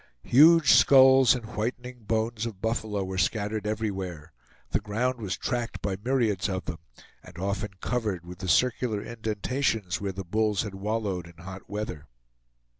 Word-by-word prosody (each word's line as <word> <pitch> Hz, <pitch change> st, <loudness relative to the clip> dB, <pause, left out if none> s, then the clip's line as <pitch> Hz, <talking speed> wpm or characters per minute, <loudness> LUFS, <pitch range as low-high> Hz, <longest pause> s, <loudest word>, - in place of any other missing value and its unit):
Huge 160 Hz, +4 st, +6 dB
skulls 130 Hz, -2 st, +7 dB
and 120 Hz, -3 st, -6 dB
whitening 120 Hz, +2 st, -5 dB
bones 110 Hz, +1 st, -1 dB
of 105 Hz, -5 st, -8 dB
buffalo 110 Hz, -2 st, -2 dB
were 95 Hz, 0 st, -4 dB
scattered 105 Hz, +2 st, -1 dB
everywhere; 95 Hz, -7 st, -4 dB, 0.4 s
the -, -, +2 dB
ground 125 Hz, +5 st, -2 dB
was 95 Hz, -3 st, -3 dB
tracked 120 Hz, -2 st, -3 dB
by 100 Hz, -2 st, -2 dB
myriads 115 Hz, -7 st, +1 dB
of 95 Hz, -1 st, -3 dB
them, 80 Hz, -, -5 dB, 0.4 s
and 90 Hz, -1 st, -14 dB
often 100 Hz, +2 st, -3 dB
covered 105 Hz, -8 st, -2 dB
with 90 Hz, 0 st, -10 dB
the 95 Hz, -, -5 dB
circular 115 Hz, +2 st, +1 dB
indentations 110 Hz, -3 st, -2 dB
where 100 Hz, -1 st, -2 dB
the 95 Hz, 0 st, -7 dB
bulls 105 Hz, +2 st, 0 dB
had 105 Hz, -3 st, -6 dB
wallowed 100 Hz, -3 st, -3 dB
in 85 Hz, -, -15 dB
the 85 Hz, -, -14 dB
hot 95 Hz, +1 st, -9 dB
weather. 100 Hz, -8 st, -5 dB
105 Hz, 160 wpm, -27 LUFS, 95-120 Hz, 0.4 s, skulls